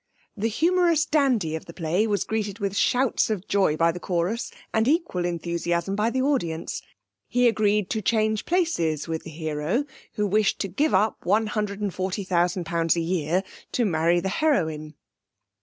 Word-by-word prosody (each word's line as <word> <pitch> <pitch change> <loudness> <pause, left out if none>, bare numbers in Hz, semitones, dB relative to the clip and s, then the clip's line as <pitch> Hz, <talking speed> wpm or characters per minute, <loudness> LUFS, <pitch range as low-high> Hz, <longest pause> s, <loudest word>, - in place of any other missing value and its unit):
The 220 +1 -1
humorous 335 - +2
dandy 255 - +1
of 160 - -6
the 170 - -12
play 175 +6 0
was 205 -2 0
greeted 210 -3 -3
with 200 -3 -2
shouts 250 +3 +2
of 210 -3 -3
joy 190 -6 +2
by 165 +1 +3
the 175 - -7
chorus 180 +7 -1 0.2
and 220 +1 +2
equal 295 - +1
enthusiasm 170 +2 -1
by 210 +2 +1
the 260 +2 0
audience. 170 - -1 0.5
He 245 0 +3
agreed 210 -3 +1
to 220 - -1
change 215 0 +1
places 245 - 0
with 160 -1 -3
the - - -10
hero, 160 - -2 0.3
who 210 - 0
wished 205 +1 +2
to 195 - -1
give 285 - +1
up 210 +3 +1
one 210 +5 +2
hundred 210 -2 -3
and 200 -3 -1
forty 190 +2 -2
thousand 180 -1 0
pounds 165 0 +1
a - - 0
year 170 +1 0 0.3
to 240 - +2
marry 170 -1 +2
the 190 - -2
heroine. 160 - 0
195 Hz, 175 wpm, -25 LUFS, 170-225 Hz, 0.5 s, by